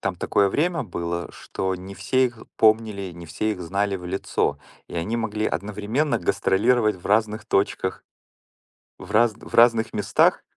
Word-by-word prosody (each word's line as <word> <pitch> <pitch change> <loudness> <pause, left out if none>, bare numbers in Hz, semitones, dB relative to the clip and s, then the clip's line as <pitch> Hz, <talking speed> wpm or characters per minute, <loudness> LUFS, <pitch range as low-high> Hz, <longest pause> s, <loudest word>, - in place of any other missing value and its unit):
там 95 -2 -2
такое 100 +3 +2
время 165 - 0
было, 85 -4 -4
что 95 0 -3
не 95 +2 -9
все 130 +7 +1
их 120 -2 -9
помнили, 110 -4 +2
не 85 0 -10
все 110 +7 -1
их 95 - -8
знали 100 +3 -1
в 90 - -10
лицо, 80 -5 -1 0.3
и - - -10
они 85 +7 -2
могли 110 -2 -1
одновременно 105 +9 -1
гастролировать 110 +1 +2
в 90 - -10
разных 110 +1 +1
точках 95 -3 0 1.0
в 90 - -11
разн 115 0 +3
в - - -15
разных 115 -1 +5
местах. - - +2
105 Hz, 160 wpm, -24 LUFS, 95-110 Hz, 1.0 s, разных